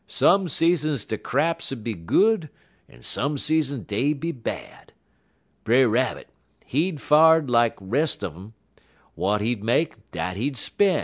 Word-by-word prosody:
Some 195 0 +3
seasons 155 -6 +1
der 110 - -3
craps 165 -2 -1
'ud 120 -5 -6
be 115 - -3
good, 165 - +1 0.4
en - - -18
some 145 - -1
seasons 145 -4 0
dey'd 140 +8 -1
be 165 +3 -2
bad. 125 -7 -8 0.7
Brer 125 +3 +4
Rabbit, 120 +2 -1 0.4
he 160 +8 0
far'd 155 -1 +4
lak 120 -1 +3
de 95 - -15
res' 140 +10 0
un 90 - -3
um. 95 +7 -13 0.6
W'at 105 +2 0
he'd 110 -1 -2
make, 115 -2 -1
dat 90 +2 -4
he'd 135 +5 -2
spen'. 190 0 +1
135 Hz, 150 wpm, -24 LUFS, 110-160 Hz, 0.7 s, Brer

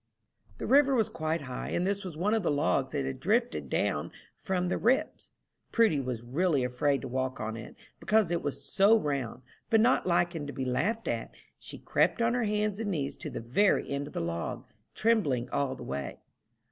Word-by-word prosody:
The - - -5
river 275 0 +5
was 225 -4 +2
quite 160 +1 -2
high, 130 -2 -5
and 175 - 0
this 200 +1 -1
was 175 -5 -7
one 200 +6 +1
of 225 - +2
the 175 - 0
logs 145 -2 +1
that 140 -2 -1
had 135 -1 -4
drifted 235 - 0
down - - 0 0.2
from 180 -2 -2
the 180 - -1
"Rips." 250 +4 +1 0.4
Prudy 225 -11 +3
was 125 -3 -4
really 145 +3 +1
afraid 135 +3 +1
to 135 - -5
walk 130 +1 -2
on 110 +1 -3
it, 115 -1 -9 0.2
because 215 -2 +2
it 170 - 0
was 140 -1 -4
"so 205 +2 +5
round," 135 - -3 0.3
but 225 - +5
not 240 -3 +3
liking 175 -3 +1
to 145 - -6
be 130 - -3
laughed 200 - -1
at, - - -2 0.3
she - - -8
crept - - +1
on 230 0 +2
her 245 -2 +1
hands 210 -1 0
and 220 -2 -2
knees 145 -7 -2
to - - -6
the - - -5
very 135 - +2
end 140 +1 -2
of - - -11
the - - -2
log, 85 0 -3 0.3
trembling 180 - +2
all 140 -2 0
the - - -9
way. 70 -1 -4
160 Hz, 205 wpm, -29 LUFS, 130-210 Hz, 0.4 s, river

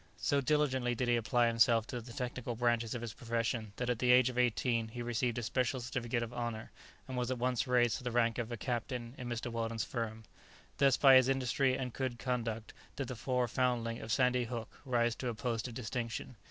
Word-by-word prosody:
So 140 -1 +1
diligently 130 -4 +1
did 125 +1 -1
he 120 - +4
apply 120 +1 +2
himself 115 -1 +4
to 120 0 -5
the 120 +1 -11
technical 125 -1 -4
branches 120 -1 +1
of 120 - -4
his 115 -2 -5
profession 115 -2 -2
that 125 - -3
at 125 -2 0
the 125 -1 +4
age 125 0 +6
of 125 - -9
eighteen 120 -1 +1
he 120 +2 -6
received 120 0 -1
a 120 - -2
special 130 +3 0
certificate 120 -1 -2
of 115 +1 -6
honour, 120 -2 -4 0.4
and 130 - -5
was 125 -1 -1
at 130 - -1
once 125 0 0
raised 120 -2 +3
to - - -12
the 125 - -1
rank 115 -1 +1
of 120 0 -3
a 120 - -3
captain 120 +1 -3
in 125 -1 -5
Mr. 120 0 -3
Weldon's 115 -1 -2
firm. 110 -2 -4 0.6
Thus 135 -2 +5
by 135 -2 +8
his 130 0 +4
industry 130 0 +2
and 125 -3 -4
good 130 -3 -2
conduct 115 -3 -3 0.2
did 135 -3 -4
the 125 - -4
poor 125 +1 0
foundling 120 -1 0
of 110 - -5
Sandy 125 0 +3
Hook 115 -1 -7
rise 120 -2 +2
to 130 - -3
a 115 - -4
post 115 -1 -2
of 120 - -8
distinction. 120 0 -4
120 Hz, 220 wpm, -33 LUFS, 115-125 Hz, 0.6 s, by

